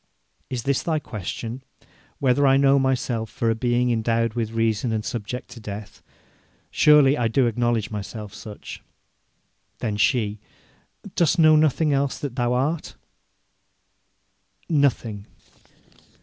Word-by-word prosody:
'Is 125 -2 -3
this 140 0 +1
thy 160 -2 0
question: 115 - -6 0.6
Whether 140 +1 +3
I 135 0 +5
know 140 0 +4
myself 125 -4 -1
for 115 +2 -1
a - - 0
being 120 +1 +1
endowed 115 0 0
with 115 -2 -2
reason 115 0 0
and 110 -1 -2
subject 120 +2 -5
to 120 0 -11
death? 105 -1 -8 0.7
Surely 150 -2 +5
I 120 - +2
do 125 +3 +2
acknowledge 120 -2 0
myself 105 0 -6
such.' 105 0 -9 1.0
Then 110 -4 -3
she: 105 -1 +1 0.7
'Dost 170 0 +2
know 155 -2 +6
nothing 155 0 +3
else 140 0 0
that 140 -4 -5
thou 120 -2 0
art?' 145 +6 -1 1.7
'Nothing.' 125 -9 0
120 Hz, 125 wpm, -23 LUFS, 110-135 Hz, 1.7 s, know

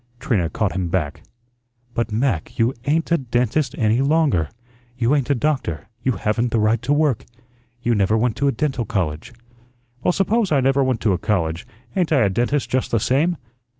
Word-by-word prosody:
Trina 110 - 0
caught 105 +1 -1
him 90 -1 -2
back. 85 -5 -2 0.7
"But, 115 -1 -1
Mac, 110 - -1
you 115 +3 +2
ain't 160 +4 0
a 170 - +4
dentist 125 +2 0
any 110 +2 +2
longer; 140 - +2 0.5
you 120 +2 +2
ain't 140 -3 +1
a 140 - +3
doctor. 130 - -2
You 130 +2 +1
haven't 115 +2 0
the 115 - +1
right 110 +2 +2
to 125 +4 -2
work. 145 -5 +2 0.6
You 120 - +2
never 105 +1 +2
went 115 0 +1
to 140 - +1
a - - +4
dental 135 -4 -1
college." 80 -4 -3 0.7
"Well, 180 - +2
suppose 200 +2 +1
I 145 - +4
never 135 +1 +3
went 130 -4 0
to 105 - +2
a 90 - -1
college, 85 -4 -1 0.3
ain't 180 -4 +1
I 140 -4 +4
a 100 - +3
dentist 125 +7 0
just 130 0 -1
the 115 - +1
same? 150 - +1
120 Hz, 190 wpm, -21 LUFS, 105-140 Hz, 0.7 s, a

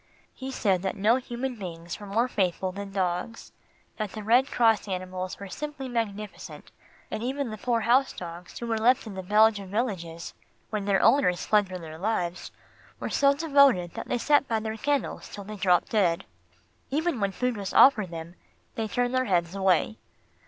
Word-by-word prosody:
He 260 0 -7
said 195 -8 +1
that 190 - -2
no 215 +4 +3
human 250 0 -4
beings 170 -3 -7
were 205 - -9
more 225 +5 +1
faithful 185 -4 -1
than 200 +1 -7
dogs; 185 +3 -3 0.5
that 215 -3 -4
the 215 - -6
red 245 +6 +4
cross 225 -3 +3
animals 185 -1 -4
were 200 - -7
simply 295 +5 -6
magnificent, 215 -4 -5 0.4
and - - -3
even 265 0 -2
the 215 - -6
poor 235 0 0
house 255 +4 +3
dogs 175 0 -9
who 235 - -5
were 225 -1 -1
left 245 +3 +3
in 215 - -7
the 190 - -5
Belgian 210 0 +3
villages, 185 -7 -3 0.4
when 210 -2 -2
their 195 -1 +2
owners 225 -8 +3
fled 210 -2 +3
for 185 - -5
their 160 -2 -9
lives, 180 -4 -2 0.5
were - - -4
so 280 0 +4
devoted 280 - +4
that - - -6
they - - 0
sat 290 +3 +3
by 225 -1 0
their 220 0 -4
kennels 280 +3 -2
till 200 - -8
they 210 +2 -8
dropped 185 -3 +2
dead. 180 -6 +1 0.6
Even 310 -1 0
when 200 -1 0
food 250 +4 -1
was 200 -2 -4
offered 215 -9 +6
them, 165 0 -7 0.4
they 225 -1 -2
turned 245 +3 -1
their 255 0 +2
heads 175 -4 +1
away. 195 +2 +1
210 Hz, 185 wpm, -27 LUFS, 185-245 Hz, 0.6 s, offered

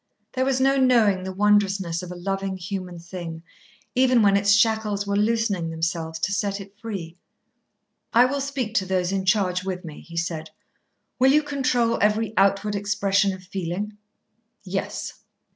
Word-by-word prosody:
There 260 0 0
was 265 -1 +1
no 270 +1 +3
knowing 235 -7 +4
the 190 0 -5
wondrousness 195 -3 +2
of 180 -1 -8
a - - -6
loving 195 +1 -3
human 185 -1 -5
thing, 170 -1 -7 0.5
even 250 -2 +4
when 200 -1 +5
its 200 0 +2
shackles 210 -1 +2
were 200 0 -1
loosening 210 -5 +1
themselves 160 0 -2
to 200 - 0
set 200 0 -1
it 195 0 -11
free. 190 -7 -6 0.9
"I 240 +2 +6
will 280 +2 -1
speak 270 -5 -3
to 190 - +1
those 185 -1 0
in 195 -1 -1
charge 185 -2 +2
with 185 -2 -4
me," 155 -2 -8
he 170 -1 -11
said. 165 -1 -3 0.7
"Will 260 +1 +6
you 300 +2 +4
control 255 -5 +1
every 215 +1 +2
outward 195 +2 +2
expression 200 -1 +1
of 185 -1 -8
feeling?" 190 +3 -4 0.7
"Yes." - - -4
200 Hz, 160 wpm, -24 LUFS, 185-220 Hz, 0.9 s, I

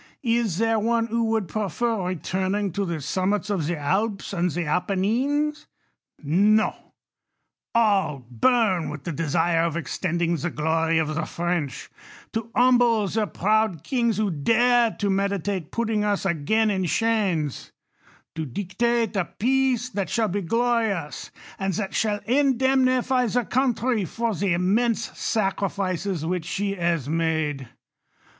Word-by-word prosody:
Is 230 -7 +1
there 225 +1 +2
one 230 +1 +1
who 230 0 0
would 220 -4 0
prefer 215 0 -1
returning 190 +3 -1
to 200 +4 -2
the 170 -4 -3
summits 195 +8 -1
of 170 -7 -1
the 175 0 -1
Alps 195 +8 -1
and 180 -1 +1
the 175 +1 -3
Appenines? 230 - 0 0.6
No: 205 +9 +2 0.8
all 195 - +2
burn 185 - +2
with 150 -1 -7
J 170 - -3
the 150 - -7
desire 165 +1 +1
of 165 -1 0
extending 170 0 -1
the 175 +3 -2
glory 160 +1 0
of 155 -1 0
the 155 +1 -2
French; 170 -5 -3 0.4
to 225 +1 -3
' - - -23
humble 245 -3 +4
the 215 0 0
proud 210 -5 +1
kings 235 0 0
who 210 -2 +1
dare 235 +9 +3
to 205 -1 -1
meditate 195 -3 -1
putting 225 -2 0
f 210 - +1
us 200 - -3
again 195 +6 +1
in 190 -2 0
chains; 180 - 0 0.6
to 160 - -4
dictate 205 - -1
a 190 -3 +1
peace 255 0 +1
that 200 -6 -3
shall 225 -2 +1
be 200 +3 -1
glo 235 +6 +1
rious, 185 -9 -3 0.3
and 195 -2 -1
that 195 0 -3
shall 210 -2 0
indemnify 260 -1 +2
the 240 +2 0
country 245 -4 +1
for 230 +5 -2
the 195 0 0
immense 220 +6 0
sacrifices 195 -4 -1
which 175 -1 -2
she 200 +3 -2
has 170 -6 -1
made. 155 -5 -1
200 Hz, 145 wpm, -24 LUFS, 170-230 Hz, 0.8 s, humble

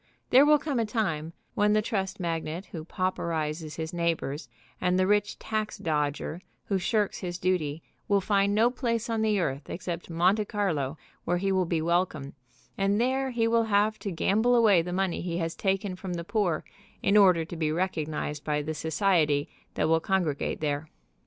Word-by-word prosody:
There 270 +4 +7
will 300 0 +7
come 285 -4 -2
a 230 - +1
time 165 -9 -1 0.2
when 210 0 +3
the 215 - +3
trust 195 -3 -2
magnate 165 +1 -3
who 160 -3 -7
pauperizes 160 -4 -2
his 160 +1 -5
neighbors 165 -3 -2 0.3
and 180 0 +2
the 185 - +3
rich 205 +1 +1
tax 215 -1 -3
dodger 155 -1 -2 0.2
who 195 -2 0
shirks 210 +2 0
his 175 -1 -4
duty 165 -5 -1 0.2
will 200 -1 +3
find 200 +1 +2
no 230 +3 +4
place 230 -2 -2
on 225 -1 0
the 215 -2 +2
earth 140 -4 -2
except 175 -1 -5
Monte 180 +6 +2
Carlo 165 -10 -1 0.3
where 175 - 0
he 195 +2 0
will 185 -2 +1
be 165 -2 0
welcome, 170 -5 0 0.5
and 200 +2 +2
there 265 +2 +1
he 235 -2 +1
will 230 0 +3
have 215 0 +2
to 200 - -4
gamble 220 +8 +2
away 215 -7 +5
the 175 +2 -5
money 185 -1 -1
he 170 -1 -3
has 165 -1 -2
taken 195 -1 -1
from 185 -1 -5
the 170 - -4
poor 185 -3 0 0.4
in 200 - +3
order 185 -5 +6
to 170 - -8
be 155 -2 0
recognized 155 -4 -2
by 150 -1 -1
the 155 +2 -3
society 155 -2 +1 0.3
that - - +1
will 165 0 +4
congregate 170 -6 -1
there. 150 0 -2
180 Hz, 185 wpm, -28 LUFS, 160-205 Hz, 0.5 s, There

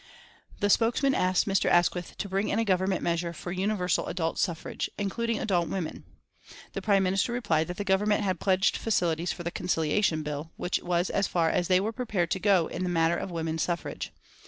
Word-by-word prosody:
The 205 - +2
spokesman 245 +6 +3
asked 185 -5 +2
Mr. 195 -2 +2
Asquith 175 0 +1
to 205 - -3
bring 195 +2 -1
in 205 - 0
a 225 - +1
Government 190 -1 +1
measure 170 0 -1
for 175 +2 -7
universal 185 -1 0
adult 165 -2 -2
suffrage, 170 -3 -2
including 230 +3 -1
adult 175 -7 0
women. 180 -5 -4 0.7
The - - -3
Prime 200 -2 +3
Minister 190 +5 +1
replied 170 -10 +1
that 180 0 -6
the 205 - -2
Government 205 +2 +2
had 185 -4 -1
pledged 190 0 +2
facilities 175 -6 0
for 175 - -6
the 170 - -3
Conciliation 165 -1 0
Bill, 150 +2 -5
which 180 - -1
was 175 0 0
as 200 - +1
far 165 -2 +1
as 175 - 0
they 185 -1 +4
were 215 +4 -2
prepared 210 -9 -1
to 190 - 0
go 190 -4 +4
in 175 - -5
the 180 - -1
matter 165 -1 +2
of 190 - -4
women's 165 -1 -2
suffrage. 175 -1 -3
185 Hz, 200 wpm, -28 LUFS, 170-200 Hz, 0.7 s, they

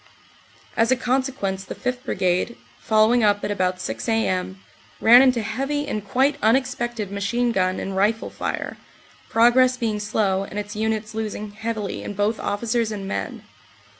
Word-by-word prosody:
As 230 +2 +2
a - - +6
consequence 250 -7 -1
the - - -7
5th. 250 0 -3
Brigade, 185 +3 0 0.2
following 220 +2 +3
up 205 -1 +3
at - - -1
about 185 -2 0
6 185 - -4
a.m., 190 -4 0 0.4
ran 240 +3 +8
into 250 -4 +3
heavy 275 +7 -2
and 215 -7 -3
quite 265 +7 +1
unexpected 240 -2 0
machine 235 +5 0
gun 185 -3 0
and 195 - -4
rifle 210 +4 +1
fire, - - -4 0.5
progress 250 +2 +4
being 220 -4 -1
slow 205 -2 0
and 195 - -8
its 205 0 -5
units 220 0 -2
losing 215 -1 -4
heavilv 215 -1 -4
in 205 - -6
both 205 +3 0
officers 225 +1 -1
and 200 -2 -5
men. - - -4
220 Hz, 155 wpm, -23 LUFS, 205-240 Hz, 0.5 s, ran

